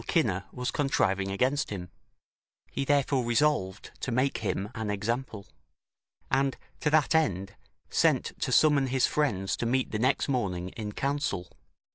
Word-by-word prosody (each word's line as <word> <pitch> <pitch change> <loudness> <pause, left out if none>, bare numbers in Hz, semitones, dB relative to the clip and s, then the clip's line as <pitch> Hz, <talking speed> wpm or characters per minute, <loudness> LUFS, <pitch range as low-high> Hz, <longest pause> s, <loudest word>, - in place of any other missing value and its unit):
Cinna 105 - +1
was 125 0 -3
contriving 100 - +1
against 130 +8 +1
him; 90 -3 -6 0.8
he 135 - -2
therefore 140 -2 +2
resolved 120 -5 +1
to 130 - -3
make 130 +3 +1
him 105 -1 -2
an 110 -3 -4
example; 105 +1 -2 0.9
and, 135 0 +2 0.2
to 150 - +1
that 150 0 +3
end, 100 - +1 0.4
sent - - +2
to - - 0
summon 145 -3 +4
his 130 0 +2
friends 100 -11 0
to 120 - -1
meet 130 +2 0
the 110 - -2
next 130 +4 +2
morning 95 -9 -1
in 105 +1 -6
counsel. 140 -11 -2
125 Hz, 145 wpm, -28 LUFS, 100-140 Hz, 0.9 s, summon